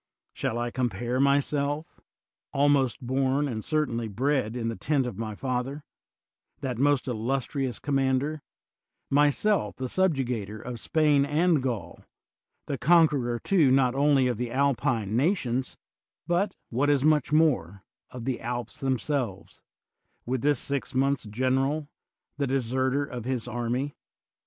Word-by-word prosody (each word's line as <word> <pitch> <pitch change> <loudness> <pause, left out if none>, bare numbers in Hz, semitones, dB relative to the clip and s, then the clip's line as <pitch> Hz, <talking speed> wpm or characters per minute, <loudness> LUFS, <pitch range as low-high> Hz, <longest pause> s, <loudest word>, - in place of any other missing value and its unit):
Shall 115 - -2
I 120 0 -2
compare 120 0 -1
myself 140 +2 0 0.3
— - - -28
^almost 140 -3 +3
bom, 135 +3 +1
and 110 -5 -4
certainly 125 -7 -1
bred, 125 +1 0
in 115 -2 -2
the 115 - -2
tent 140 0 0
of 115 -5 -5
my 110 -2 -4
father,^ 130 +4 -3 0.8
that 125 -4 -3
most 140 -1 +2
illustrious 130 +2 -2
commander, 135 +2 0 0.7
myself 145 - +2
the 130 - -4
subjugator 125 - -1
of 120 0 -6
Spain 150 -1 +3
and 155 +2 +2
Gaul, 110 -10 -4 0.6
the 140 - -3
conqueror 145 -5 +4
too 160 +1 +3
not 130 -1 +3
only 140 -1 +3
of 125 -3 0
the 120 +1 -3
Alpine 125 -5 +1
nations, 130 - 0 0.5
but, 180 +4 0 0.2
what 135 +5 +1
is 145 -1 +3
much 150 -3 +3
more, 125 - +2 0.3
of 125 -2 -8
the 130 -2 -2
Alps 120 +3 -4
themselves 130 -6 -2 0.3
— - - -43
^with 130 0 -1
this 145 -1 +2
six 140 +1 -3
months' 135 -1 +1
general, 135 +6 0 0.5
the 140 - +1
deserter 130 +2 0
of 125 -4 -7
his 125 -2 -2
army? 120 +4 -2
130 Hz, 135 wpm, -27 LUFS, 120-145 Hz, 0.8 s, conqueror